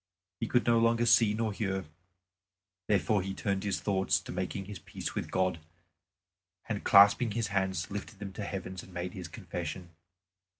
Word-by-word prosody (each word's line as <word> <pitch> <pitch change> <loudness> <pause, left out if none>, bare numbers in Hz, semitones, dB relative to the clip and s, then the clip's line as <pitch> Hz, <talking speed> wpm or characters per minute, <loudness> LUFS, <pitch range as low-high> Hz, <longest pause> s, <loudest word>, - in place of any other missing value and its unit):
He 115 - -1
could 120 +1 +2
no 115 -1 +4
longer 115 +1 +3
see 115 -2 +5
nor 110 -1 -1
hear. 95 -2 -2 1.0
Therefore 105 0 +2
he 95 +1 -4
turned 100 -1 -1
his 100 -2 -1
thoughts 95 -2 +1
to - - -8
making 95 +2 -3
his 100 -1 -8
peace - - -6
with - - -3
God, 95 -3 0 1.1
and - - -3
clasping 100 +3 +6
his 115 -2 -1
hands 95 -3 -1
lifted 100 +2 -6
them 100 -1 -7
to 105 - -5
heaven 95 -2 -5
and 95 - -14
made 90 0 -4
his 90 -3 -6
confession. 90 -2 -6
100 Hz, 170 wpm, -31 LUFS, 95-105 Hz, 1.1 s, clasping